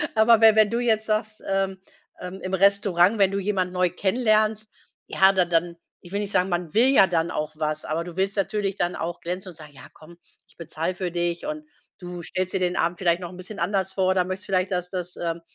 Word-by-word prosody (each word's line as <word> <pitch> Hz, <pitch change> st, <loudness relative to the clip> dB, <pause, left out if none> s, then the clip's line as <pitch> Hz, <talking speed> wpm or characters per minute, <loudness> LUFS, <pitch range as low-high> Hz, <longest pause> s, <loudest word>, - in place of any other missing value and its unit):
aber 220 Hz, +1 st, +5 dB
we 220 Hz, -1 st, +7 dB
wenn 215 Hz, -1 st, +5 dB
du 235 Hz, -, 0 dB
jetzt 220 Hz, -3 st, +1 dB
sagst, 215 Hz, 0 st, -2 dB
ähm, 195 Hz, -1 st, -1 dB, 0.4 s
ähm, 180 Hz, +1 st, -7 dB
im 185 Hz, -, -5 dB
Restaurant, 200 Hz, 0 st, +3 dB
wenn 195 Hz, -1 st, +5 dB
du 200 Hz, -, -2 dB
jemand 190 Hz, -2 st, -1 dB
neu 180 Hz, 0 st, +1 dB
kennenlernst, 215 Hz, +2 st, +1 dB, 0.4 s
ja, 190 Hz, 0 st, +4 dB
dann 180 Hz, -2 st, +1 dB
dann 170 Hz, +1 st, +1 dB, 0.3 s
ich 175 Hz, -, -12 dB
will 200 Hz, -, -1 dB
nicht 205 Hz, -1 st, -4 dB
sagen, 185 Hz, 0 st, +1 dB
man 175 Hz, -2 st, -3 dB
will 235 Hz, +4 st, +4 dB
ja 265 Hz, -8 st, +6 dB
dann 170 Hz, -1 st, 0 dB
auch 155 Hz, 0 st, -3 dB
was, 155 Hz, 0 st, -3 dB
aber 160 Hz, +2 st, -2 dB
du 175 Hz, -1 st, -9 dB
willst 195 Hz, +1 st, 0 dB
natürlich 200 Hz, 0 st, -1 dB
dann 175 Hz, -2 st, -1 dB
auch 170 Hz, +1 st, -4 dB
glänzen 180 Hz, +2 st, -5 dB
und 175 Hz, -, -12 dB
sagen: 155 Hz, -2 st, -12 dB
„Ja -, -, -13 dB
komm, 170 Hz, +2 st, -16 dB, 0.3 s
ich -, -, -26 dB
bezahle 165 Hz, +2 st, -4 dB
für 180 Hz, -1 st, -3 dB
dich.“ 175 Hz, +2 st, -2 dB
Und 305 Hz, 0 st, -5 dB, 0.4 s
du 180 Hz, -1 st, -7 dB
stellst 185 Hz, +2 st, -3 dB
dir 190 Hz, -, 0 dB
den 180 Hz, -1 st, 0 dB
Abend 170 Hz, +1 st, 0 dB
vielleicht 175 Hz, -2 st, +1 dB
noch 175 Hz, -, -6 dB
'n 180 Hz, -, -12 dB
bisschen 195 Hz, +3 st, -8 dB
anders 190 Hz, -2 st, -1 dB
vor 190 Hz, -1 st, +1 dB
oder 185 Hz, -1 st, +1 dB
möchtest 185 Hz, +2 st, -5 dB
vielleicht, 185 Hz, 0 st, 0 dB
dass 180 Hz, -1 st, -2 dB
dass 180 Hz, -1 st, -5 dB
ähm, 170 Hz, -1 st, -3 dB
185 Hz, 235 wpm, -24 LUFS, 175-205 Hz, 0.4 s, we